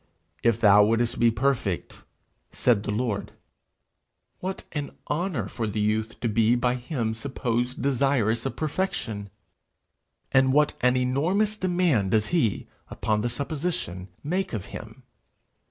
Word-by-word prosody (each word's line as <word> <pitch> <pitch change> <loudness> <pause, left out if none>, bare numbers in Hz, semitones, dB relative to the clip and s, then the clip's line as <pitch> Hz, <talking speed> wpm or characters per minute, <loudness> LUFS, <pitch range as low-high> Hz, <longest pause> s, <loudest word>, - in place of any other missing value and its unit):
'If 115 -1 +2
thou 105 -2 +7
wouldest 115 +2 +1
be 120 - +5
perfect,' 115 -5 -1 0.5
said 120 -5 +2
the 105 - -5
Lord. 105 -1 -2 1.1
What 190 +1 -4
an 145 -2 -5
honour 150 - -1
for 110 +1 -3
the 105 0 -2
youth 110 +1 0
to 120 - +1
be 115 +2 +3
by 125 0 +1
him 125 -3 -2
supposed 125 0 -2
desirous 130 -4 +2
of - - -5
perfection! 135 - -2 1.0
And 130 -1 +4
what 150 +1 +4
an 125 +1 +4
enormous 165 +12 +1
demand 175 - +1
does 110 +1 +2
he, 145 - +1 0.2
upon 105 -1 -1
the 120 - 0
supposition, 140 - -3 0.2
make 185 +3 -1
of 105 -5 -3
him! - - -9
120 Hz, 135 wpm, -26 LUFS, 110-145 Hz, 1.1 s, thou